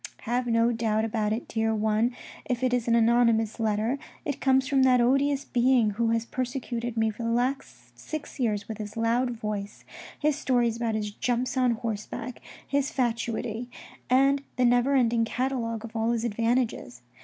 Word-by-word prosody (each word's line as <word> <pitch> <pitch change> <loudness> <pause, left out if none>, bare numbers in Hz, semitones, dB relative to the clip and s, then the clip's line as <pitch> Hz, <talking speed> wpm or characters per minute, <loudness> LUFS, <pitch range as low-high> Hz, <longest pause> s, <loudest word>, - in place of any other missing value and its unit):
" - - -24
Have 245 0 0
no 230 0 +3
doubt 220 -1 0
about 215 -2 -1
it, 220 +3 -3
dear 225 0 0
one, 220 +2 +1 0.3
if 250 0 -2
it 255 -1 +2
is 245 -2 0
an 235 - +4
anonymous 230 -1 +3
letter, 220 +4 0 0.3
it 285 - -3
comes 265 0 +3
from 275 -2 +2
that 255 -1 +5
odious 275 +3 +2
being 245 -4 +3
who 225 +3 0
has 230 0 0
persecuted 240 -2 -4
me 220 0 +2
for 215 - -10
the 230 - -1
last 235 - -2
six 300 - -7
years 210 -5 0
with 220 -1 -6
his 210 +1 -7
loud 235 +3 +1
voice, 210 -3 -5 0.3
his 300 -1 +1
stories 245 -5 +1
about 230 -2 -1
his 210 -1 -2
jumps 245 +5 -1
on 255 -2 +3
horseback, 225 +2 -5 0.3
his 280 0 0
fatuity, 235 -3 -2 0.4
and 275 +2 +4
the 250 - +2
never 245 +3 +3
ending 235 -3 +3
catalogue 230 -2 -2
of 225 0 -11
all 225 0 0
his 235 -1 0
advantages. 230 - -1
235 Hz, 180 wpm, -27 LUFS, 220-255 Hz, 0.4 s, that